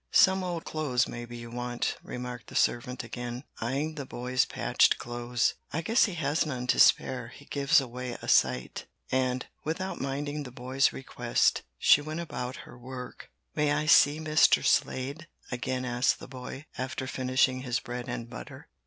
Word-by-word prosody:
"Some 190 0 +5
old 175 -2 -3
clothes 145 -6 0
maybe 120 0 -7
you 120 0 -9
want," 120 0 -2
remarked 125 -1 -6
the - - -11
servant 125 +1 +1
again, 120 +1 -6 0.2
eying 140 +7 -1
the 145 -3 -5
boy's 125 +1 0
patched - - +3
clothes. 120 0 -1 0.2
"I 160 - -1
guess 225 +9 +4
he 200 -5 -4
has 150 -1 +1
none 130 -6 -3
to - - -3
spare; 125 -3 +4
he 140 +4 -14
gives 140 -1 +3
away 125 -1 -5
a - - -9
sight." 65 -1 +2 0.2
And, 130 -1 +1 0.2
without 185 +5 -3
minding 145 +2 -2
the 135 - -7
boy's 130 +2 +1
request, 120 -2 +1 0.2
she 145 - +6
went 155 +2 -5
about 130 -6 -4
her 120 - -13
work. 125 0 -8 0.2
"May 150 -1 +2
I 150 +1 0
see 150 0 +6
Mr. 155 -1 +4
Slade?" 140 +6 +1 0.2
again 130 +1 -2
asked 120 +1 +2
the - - -10
boy, 130 +2 -8
after 130 0 -3
finishing 130 0 +1
his 120 -3 -1
bread 125 +2 -6
and 120 -1 -4
butter. 120 - -10
130 Hz, 170 wpm, -29 LUFS, 125-145 Hz, 0.2 s, she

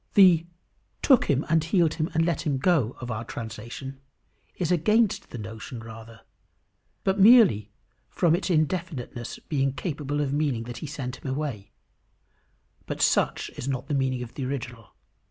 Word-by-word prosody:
The 175 -4 +6 0.6
"took 265 -5 +5
him 140 0 +1
and 160 -1 +3
healed 165 -1 +2
him 160 0 -2
and 165 0 +3
let 170 -1 0
him 145 -3 -1
go," 135 - +1
of 120 0 -5
our 110 +1 -3
translation, 120 +4 -7 0.5
is 175 -1 -1
against 210 +6 +2
the - - -7
notion 110 +2 -7
rather, 115 0 -11 0.8
but 195 +1 +1
merely 195 - +6 0.4
from 170 -3 +2
its 190 - -3
indefiniteness 155 -7 -2
being 135 -3 0
capable 145 -2 -3
of 140 -2 -1
meaning 145 -6 0
that 120 +1 -7
he 155 - -6
sent 130 -3 -5
him 135 - -6
away; 135 -8 -4 1.2
but - - -4
such - - +1
is 125 - -6
not 130 -2 -3
the - - 0
meaning 130 -2 0
of 115 - -10
the 135 - -5
original. 125 -3 -6
140 Hz, 160 wpm, -26 LUFS, 120-165 Hz, 1.2 s, The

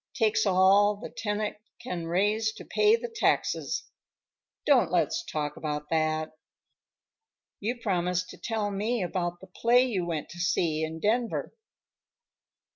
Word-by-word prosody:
Takes 220 -2 +2
all 195 +2 +5
the 205 - -9
tenant 210 -1 -2 0.2
can 170 -2 -5
raise 210 +5 +1
to - - -11
pay 425 +1 +4
the 475 +1 -4
taxes. 455 -1 0 0.8
Don't 280 -4 +4
let's 170 -4 +1
talk 150 -1 -3
about 150 -1 -4
that. 155 -1 0 1.3
You 235 +4 -2
promised 180 -4 -1
to - - -11
tell 220 -3 -2
me 215 +2 -1
about 175 -1 -2
the - - -10
play 235 +6 +3
you 205 -8 -1
went 160 -3 -3
to 175 - -10
see 165 -2 +1
in 160 +1 -4
Denver." 230 +6 0
195 Hz, 135 wpm, -28 LUFS, 170-220 Hz, 1.3 s, all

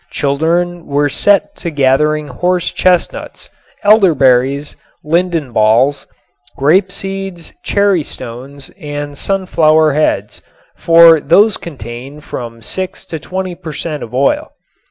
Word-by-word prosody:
Children 165 +5 -1
were 145 +1 +1
set 200 +7 +1
to 170 - -4
gathering 150 +1 +1
horse 175 +6 -1
chestnuts, 180 -1 -1 0.3
elderberries, 140 - +3 0.3
linden 165 -3 -1
balls, 115 +6 +2 0.5
grape 185 +7 +2
seeds, 195 -3 -6
cherry 200 -4 +2
stones 135 +1 -9
and 145 -1 -6
sunflower 160 -4 +2
heads, 155 +2 -1 0.3
for 165 -1 +6
these 200 +9 +3
contain 130 -1 -9
from 115 -5 -8
six 190 - -5
to 160 -4 -6
twenty 185 +2 -5
per 170 -3 -9
cent. 150 -2 -5
of 110 - -8
oil. 135 +2 0
155 Hz, 115 wpm, -14 LUFS, 140-180 Hz, 0.5 s, for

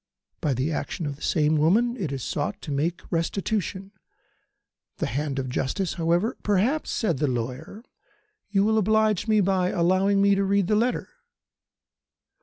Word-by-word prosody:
By 145 -4 0
the 135 +6 -1
action 165 +2 -3
of 145 -1 -3
the 145 - -21
same 155 -1 +2
woman 220 +11 +3
it 180 - -3
is 135 -3 -4
sought 155 +7 -3
to 150 - -5
make 160 +5 -1
restitution. 195 +3 -2 1.1
The - - -1
hand 140 +3 -2
of 130 -1 -2
justice, 135 +8 -2
however 175 +7 0
" - - -32
"Perhaps," 210 +10 +1
said 170 - -1
the 150 - +1
lawyer, 130 - -4 0.7
"you 200 -1 +2
will 220 +1 +3
oblige 215 0 +2
me 215 -1 +4
by 185 -1 +1
allowing 185 +3 +2
me 200 0 +4
to 195 0 +1
read 200 0 +2
the 210 - +1
letter." 240 +4 0
185 Hz, 165 wpm, -25 LUFS, 150-205 Hz, 1.1 s, me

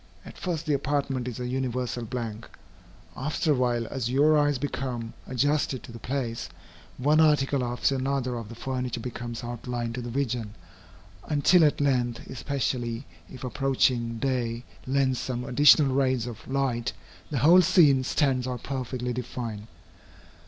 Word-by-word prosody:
At - - -10
first 170 -4 -3
the 150 - +1
apartment 140 -2 -1
is 125 -2 -5
a 125 - -3
universal 125 -2 -2
blank. 115 -2 -5 0.7
After 150 +3 0
a - - +4
while, 120 -2 +1
as 130 -4 -2
your 145 +4 +4
eyes 145 -2 +3
become 125 -4 -4
adjusted 140 0 0
to - - -10
the 115 - -9
place, 120 -3 -3 0.5
one 150 +5 +3
article 145 -3 +3
after 120 +3 0
another 130 -1 -1
of 115 -3 -6
the 115 - -8
furniture 125 -1 -3
becomes 120 0 -6
outlined 120 0 -4
to 125 - -4
the 120 - -5
vision, 120 -4 -2 0.7
until 160 +4 +4
at 150 - +3
length, 125 -4 0
especially 125 -2 -2 0.3
if 125 - -10
approaching 125 -3 +1
day 120 -2 -1 0.2
lends 130 -1 +1
some 125 -1 -3
additional 140 +1 +6
rays 130 -3 +1
of 115 -3 -8
light, 130 -3 -1 0.4
the 145 - -2
whole 170 +8 +7
scene 155 -7 +5
stands 130 -2 +1
out 125 -2 -4
perfectly 125 -2 -3
defined. 115 -3 -5
130 Hz, 150 wpm, -27 LUFS, 120-140 Hz, 0.7 s, whole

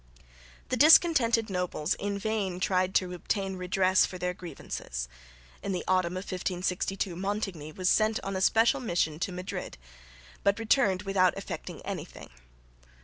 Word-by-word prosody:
The 255 - 0
discontented 280 -7 +6
nobles 180 -5 -1
in 200 0 -3
vain 200 -3 -2
tried 185 0 +1
to 180 -1 +1
obtain 190 +2 -2
redress 185 +1 +2
for 185 - -3
their 180 0 -2
grievances. 60 - -6 0.5
In 195 - -3
the 180 - -2
autumn 185 -2 +2
of 185 - -4
1562 185 0 -2
Montigny 195 -5 -3
was 185 +3 -3
sent 215 +2 +3
on 195 0 -3
a 190 - -2
special 225 +7 +4
mission 170 -9 -1
to 185 - -2
Madrid, 180 +1 -6 0.6
but 200 0 +2
returned 225 -4 +2
without 190 -2 +2
effecting - - -7
anything. - - -7
190 Hz, 145 wpm, -29 LUFS, 180-205 Hz, 0.6 s, discontented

